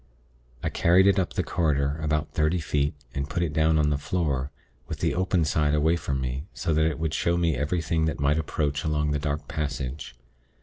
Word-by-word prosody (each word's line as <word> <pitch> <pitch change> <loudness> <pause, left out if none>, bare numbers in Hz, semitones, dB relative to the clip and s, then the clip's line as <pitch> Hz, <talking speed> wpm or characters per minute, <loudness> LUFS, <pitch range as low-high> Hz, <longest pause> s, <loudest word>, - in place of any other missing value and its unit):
I - - 0
carried 90 +3 +4
it 100 -1 +4
up 90 - -1
the - - 0
corridor, 70 -2 0
about 75 -1 -1
thirty 80 +3 +2
feet, 75 -3 0 0.2
and 70 +1 -3
put 85 - -1
it 80 -3 -2
down 80 +1 +3
on 75 -1 +2
the 70 - 0
floor, 70 -5 -1 0.4
with - - -5
the - - 0
open 90 -2 +1
side 75 -1 +1
away 80 +3 +3
from 70 -5 -2
me, 65 +3 -3
so 80 - -1
that 80 +1 +3
it 80 - -4
would 80 -1 -2
show 85 0 +1
me 85 -2 +1
anything 80 +3 0
that 80 - -2
might 70 +2 +2
approach 75 -1 -1
along 75 -1 0
the 75 - 0
dark 75 0 -3
passage. 70 -2 -4
75 Hz, 210 wpm, -26 LUFS, 70-80 Hz, 0.4 s, carried